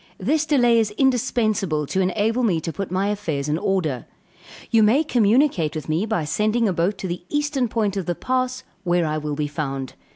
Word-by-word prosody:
This 310 0 0
delay 245 -6 +4
is 220 -2 +1
indispensable 215 - +1
to 190 +7 -1
enable 215 +6 +1
me 195 -9 +2
to 165 - -4
put 195 -1 -4
my 190 +3 0
affairs 160 -9 -2
in 150 +2 0
order. 160 - -1 0.6
You 225 - +5
may 230 +9 +4
communicate 225 - +2
with 155 - -5
me 165 +7 0
by 175 -8 -1
sending 215 +8 +1
a 190 - +1
boat 175 +4 0
to 190 - -4
the 175 0 -5
eastern 295 -3 0
point 215 -3 -1
of 195 -3 -3
the 175 - -1
pass, 255 +2 -1 0.2
where 175 -2 +1
I 155 0 -1
will 150 -1 -3
be 150 0 -1
found. 135 -3 -4
200 Hz, 200 wpm, -22 LUFS, 160-235 Hz, 0.6 s, You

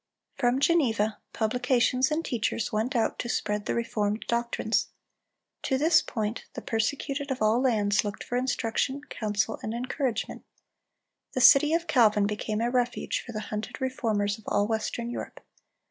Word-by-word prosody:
From 245 0 +1
Geneva, 230 -10 +2
publications 250 +3 +1
and 315 +2 -1
teachers 225 -2 -1
went 225 +5 -1
out 230 - +1
to 240 - -3
spread 210 -3 -1
the - - 0
reformed 215 -2 -1
doctrines. 235 -1 0 0.7
To 265 - 0
this 315 +3 +5
point 220 -1 -3
the - - -6
persecuted 275 +5 -2
of 265 - -2
all 215 +3 +3
lands 210 -6 +2
looked 205 -1 -5
for 245 - -4
instruction, 260 +2 -1
counsel, 215 0 -1
and 220 +1 -4
encouragement. 255 0 -2 0.9
The 255 - 0
city 300 +5 +7
of 335 0 -1
Calvin 220 -9 +4
became 210 +1 -2
a 240 +1 0
refuge 245 -1 0
for 240 - -9
the 215 -2 -4
hunted 210 +6 -4
Reformers 220 -6 -1
of 215 - -18
all 205 0 +2
Western 230 +2 -2
Europe. - - -6
235 Hz, 155 wpm, -27 LUFS, 215-260 Hz, 0.9 s, city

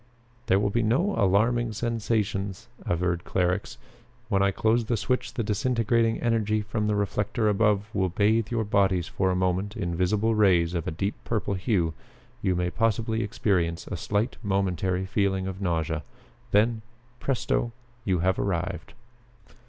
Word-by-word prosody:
"There 95 - +4
will 100 0 +1
be 120 - +1
no 135 - +2
alarming 115 +4 +2
sensations," 105 -4 -2 0.2
averred 85 0 0
Clarux. 90 +1 -1 0.5
"When 100 -3 +2
I 100 - +4
close 110 +4 +1
the 115 +1 0
switch 125 +4 -1
the 115 - -1
disintegrating 115 +1 +1
energy 110 -3 +1
from 105 0 -2
the 105 - +1
reflector 105 +2 0
above 105 -1 +2
will 95 -2 +1
bathe 105 +4 +2
your 115 -2 0
bodies 95 -4 +2
for 95 -1 0
a 90 - +1
moment 95 +4 0
in 85 -5 -2
visible 105 +6 +1
rays 90 -6 +3
of 85 -3 -2
a - - +1
deep 95 +6 -2
purple 105 -3 -1
hue. 90 -4 0 0.5
You 95 - +1
may 90 0 0
possibly 115 +1 0
experience 90 -6 0
a - - -5
slight 105 +7 -1
momentary 95 -2 0
feeling 95 -1 0
of 95 0 -5
nausea. 80 -4 -1 0.5
Then 110 +2 +3 0.4
presto! 120 -2 0 0.3
you 95 -5 +1
have 95 0 +2
arrived." 90 -1 -2
100 Hz, 150 wpm, -26 LUFS, 95-110 Hz, 0.5 s, There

